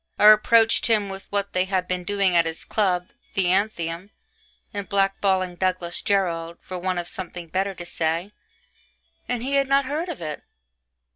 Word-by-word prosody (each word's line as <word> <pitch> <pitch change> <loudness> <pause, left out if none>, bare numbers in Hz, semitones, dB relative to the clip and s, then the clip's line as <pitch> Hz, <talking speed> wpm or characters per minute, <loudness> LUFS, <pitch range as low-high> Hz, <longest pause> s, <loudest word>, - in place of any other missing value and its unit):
I - - +3
reproached 225 +2 +6
him 210 -3 +2
with 195 0 -8
what 200 0 -1
they 185 0 +2
had 185 -1 -1
been 180 -1 -2
doing 195 -1 +1
at 170 -1 +4
his 160 0 -6
club 185 -4 0 0.3
(the 195 - +2
Athenæum) 180 -2 0 0.6
in 200 -2 -4
blackballing 195 -2 +1
Douglas 185 -2 -1
Jerrold, 170 -4 0
for 185 -1 -7
want 185 0 -1
of 175 0 -3
something 175 -2 -6
better 190 +3 -1
to 175 - -8
say 165 +3 -1 1.0
and 245 -1 -1
he 275 +2 -2
had 275 -1 +2
not 275 0 +3
heard 310 +6 -2
of 340 - -5
it. 155 -3 -5
190 Hz, 170 wpm, -24 LUFS, 175-205 Hz, 1.0 s, reproached